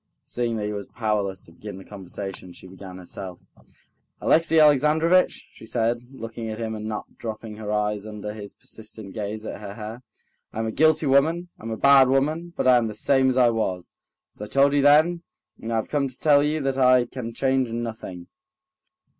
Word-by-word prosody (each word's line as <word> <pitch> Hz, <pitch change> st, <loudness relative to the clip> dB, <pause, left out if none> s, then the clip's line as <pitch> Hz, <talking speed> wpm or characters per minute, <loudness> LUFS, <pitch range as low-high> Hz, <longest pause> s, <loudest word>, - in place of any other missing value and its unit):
Seeing 120 Hz, -2 st, -2 dB
that 105 Hz, -, -2 dB
he 105 Hz, -, -3 dB
was 100 Hz, -1 st, -5 dB
powerless 105 Hz, -5 st, -2 dB
to -, -, -18 dB
begin 100 Hz, +3 st, -9 dB
the 95 Hz, -, -11 dB
conversation, 95 Hz, -2 st, -7 dB
she 85 Hz, -, -14 dB
began 95 Hz, 0 st, -10 dB
herself. 90 Hz, 0 st, -8 dB, 0.8 s
"Alexey 165 Hz, 0 st, +3 dB
Alexandrovitch," 155 Hz, +4 st, +4 dB
she 110 Hz, -, -13 dB
said, 115 Hz, +1 st, 0 dB
looking 115 Hz, -3 st, -7 dB
at 110 Hz, -, -5 dB
him 110 Hz, -1 st, -3 dB
and 110 Hz, 0 st, -5 dB
not 110 Hz, -1 st, -6 dB
dropping 110 Hz, -1 st, -6 dB
her 105 Hz, -1 st, -5 dB
eyes 105 Hz, -1 st, 0 dB
under 105 Hz, -1 st, -6 dB
his 105 Hz, -2 st, -9 dB
persistent 110 Hz, -3 st, -10 dB
gaze 105 Hz, 0 st, -5 dB
at 105 Hz, -, -6 dB
her 100 Hz, -1 st, -7 dB
hair, 110 Hz, +3 st, -7 dB, 0.5 s
"I'm 110 Hz, +1 st, -2 dB
a 110 Hz, -, -2 dB
guilty 155 Hz, +4 st, +3 dB
woman, 160 Hz, +6 st, +2 dB
I'm 115 Hz, -, -7 dB
a 110 Hz, -, -3 dB
bad 140 Hz, 0 st, +6 dB
woman, 155 Hz, +6 st, 0 dB
but -, -, +1 dB
I 125 Hz, -1 st, +7 dB
am 115 Hz, -2 st, +1 dB
the 105 Hz, -, -6 dB
same 135 Hz, -1 st, +3 dB
as 130 Hz, -, 0 dB
I 125 Hz, -2 st, +5 dB
was, 95 Hz, -6 st, -2 dB, 0.4 s
as -, -, -15 dB
I 105 Hz, -, -5 dB
told 140 Hz, +5 st, +3 dB
you 145 Hz, -, +3 dB
then, 155 Hz, +5 st, +5 dB, 0.4 s
and 115 Hz, -, -5 dB
I -, -, 0 dB
have 110 Hz, -, -1 dB
come 145 Hz, -2 st, +1 dB
to 130 Hz, -, -9 dB
tell 145 Hz, -2 st, +5 dB
you 150 Hz, +1 st, 0 dB
that 135 Hz, -1 st, -1 dB
I 125 Hz, -1 st, +5 dB
can 120 Hz, -1 st, -6 dB
change 130 Hz, 0 st, 0 dB
nothing." 110 Hz, -6 st, -5 dB
115 Hz, 200 wpm, -24 LUFS, 105-135 Hz, 0.8 s, I